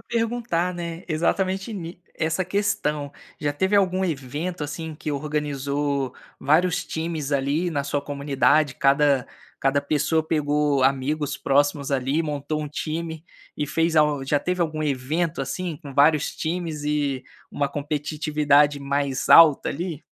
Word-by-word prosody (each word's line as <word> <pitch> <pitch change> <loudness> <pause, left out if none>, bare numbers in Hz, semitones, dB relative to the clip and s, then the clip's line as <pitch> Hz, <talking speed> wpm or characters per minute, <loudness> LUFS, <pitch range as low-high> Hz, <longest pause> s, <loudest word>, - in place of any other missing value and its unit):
perguntar, 230 -7 -1
né, 170 -1 -6
exatamente 190 +6 0
ni 175 -3 -7
essa 160 +4 -1
questão. 150 -7 -1 0.3
Já 145 -1 0
teve 190 +7 0
algum 190 -1 +3
evento, 155 +3 -3
assim, 155 +2 -5
que 150 - -5
organizou 140 -2 -2 0.2
vários 175 +5 +2
times, 160 -3 -3
ali, 140 +6 +1
na 145 -4 -1
sua 145 0 -1
comunidade, 140 0 +1
cada 140 -1 +3 0.3
cada 135 +1 +2
pessoa 155 +2 +1
pegou 150 -3 +1
amigos 140 +2 0
próximos, 145 0 +1
ali, 135 +3 0
e - - +2
montou 150 0 -3
um 150 - -5
time 160 +2 -4 0.3
e 145 - -1
fez 165 +2 0
al 150 -2 +3
já 145 +2 +2
teve 180 +4 -2
algum 155 -2 -1
evento, 150 +4 -1
assim, 165 +5 -3
com 140 -2 -10
vários 150 +1 +3
times 160 -3 -3
e 145 -3 -1 0.3
uma 145 - 0
competitividade 150 -1 +1
mais 140 -1 -1
alta, 160 -4 +8
ali? 165 -1 -5
150 Hz, 140 wpm, -24 LUFS, 140-165 Hz, 0.3 s, alta